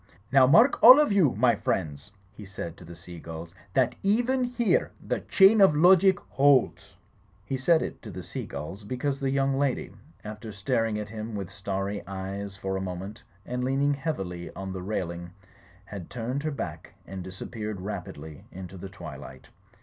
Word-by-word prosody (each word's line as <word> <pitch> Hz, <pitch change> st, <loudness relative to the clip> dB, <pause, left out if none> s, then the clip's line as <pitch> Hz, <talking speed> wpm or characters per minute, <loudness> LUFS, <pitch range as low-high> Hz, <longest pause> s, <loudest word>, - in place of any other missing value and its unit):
Now, 135 Hz, -1 st, +6 dB
mark 225 Hz, -, +5 dB
all 255 Hz, +5 st, +11 dB
of 300 Hz, -7 st, +3 dB
you, 185 Hz, -10 st, +3 dB
my 120 Hz, +2 st, +4 dB
friends," 80 Hz, -3 st, -3 dB, 0.2 s
he 105 Hz, -, -11 dB
said 90 Hz, -4 st, -7 dB
to -, -, -13 dB
the 85 Hz, +1 st, -11 dB
seagulls 85 Hz, -1 st, -9 dB, 0.2 s
"that 130 Hz, -2 st, +3 dB
even 245 Hz, +6 st, +2 dB
here 245 Hz, -2 st, +1 dB
the -, -, -2 dB
chain 200 Hz, +2 st, +5 dB
of 190 Hz, -6 st, +6 dB
logic 185 Hz, +3 st, +5 dB
holds." 135 Hz, -2 st, +2 dB, 0.5 s
He 135 Hz, -, -2 dB
said 160 Hz, +5 st, +3 dB
it -, -, -6 dB
to -, -, -9 dB
the -, -, -7 dB
seagulls 95 Hz, +7 st, -7 dB
because 130 Hz, +5 st, -2 dB
the 135 Hz, -, -1 dB
young 135 Hz, 0 st, +1 dB
lady, 140 Hz, -2 st, -1 dB, 0.3 s
after 110 Hz, +1 st, -7 dB
staring 110 Hz, +2 st, -1 dB
at 105 Hz, 0 st, -5 dB
him 110 Hz, 0 st, -6 dB
with 100 Hz, -4 st, -5 dB
starry 100 Hz, +1 st, -3 dB
eyes 95 Hz, +1 st, -5 dB
for 95 Hz, 0 st, -3 dB
a -, -, -3 dB
moment 95 Hz, +4 st, -6 dB, 0.2 s
and 125 Hz, 0 st, -3 dB
leaning 135 Hz, +2 st, +1 dB
heavily 95 Hz, -, -4 dB
on 95 Hz, -1 st, -5 dB
the 95 Hz, -, -5 dB
railing, 85 Hz, -3 st, -4 dB, 0.6 s
had 100 Hz, -5 st, -8 dB
turned 125 Hz, +3 st, -3 dB
her 155 Hz, -, -2 dB
back 140 Hz, -, -6 dB
and 95 Hz, 0 st, -7 dB
disappeared 105 Hz, +3 st, -6 dB
rapidly 80 Hz, -6 st, -7 dB
into 95 Hz, +1 st, -9 dB
the 95 Hz, +2 st, -8 dB
twilight. 65 Hz, -8 st, -10 dB
105 Hz, 170 wpm, -27 LUFS, 95-140 Hz, 0.6 s, all